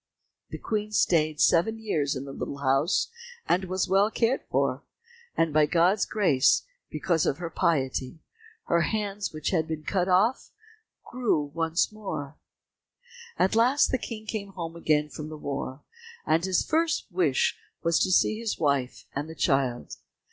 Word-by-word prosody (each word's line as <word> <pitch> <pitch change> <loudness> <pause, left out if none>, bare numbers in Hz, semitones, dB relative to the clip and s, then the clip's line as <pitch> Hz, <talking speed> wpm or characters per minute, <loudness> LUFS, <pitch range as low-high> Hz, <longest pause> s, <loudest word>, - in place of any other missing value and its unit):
The - - -6
Queen 215 -1 -3
stayed 155 -7 +2
seven 220 +7 +3
years 155 -11 -1
in 130 +1 -5
the 140 - -7
little 140 - -5
house, 140 +5 +1 0.4
and 185 +2 +2
was 185 +1 -1
well 195 +3 +3
cared 230 +3 +1
for, - - 0 0.6
and 165 -2 +2
by 155 -1 +4
God's 180 +5 +2
grace, 155 -11 +3 0.3
because 165 -4 0
of 140 - 0
her 170 -2 -5
piety, 135 -4 0 0.5
her 170 0 +2
hands 205 +1 -2
which 155 -1 -3
had 160 -4 +1
been 160 -2 -4
cut 180 +2 0
off, 205 +8 +2 0.6
grew 205 - -1
once 165 +3 0
more. 155 -9 -6 1.0
At 190 - +2
last 250 +5 +4
the 260 - +1
King 220 -2 -7
came 200 -3 -5
home 170 -2 -6
again 150 -3 +1
from 150 +1 -7
the 155 - -8
war, 140 -1 -5 0.4
and 160 +2 +2
his 190 -1 +1
first 320 -1 +1
wish 170 -7 +1 0.2
was 170 -1 +2
to 185 - +1
see 215 +4 +3
his 230 -2 -2
wife 140 -4 -1
and 145 +3 -4
the 160 - -8
child. 135 -5 0
170 Hz, 160 wpm, -27 LUFS, 150-205 Hz, 1.0 s, by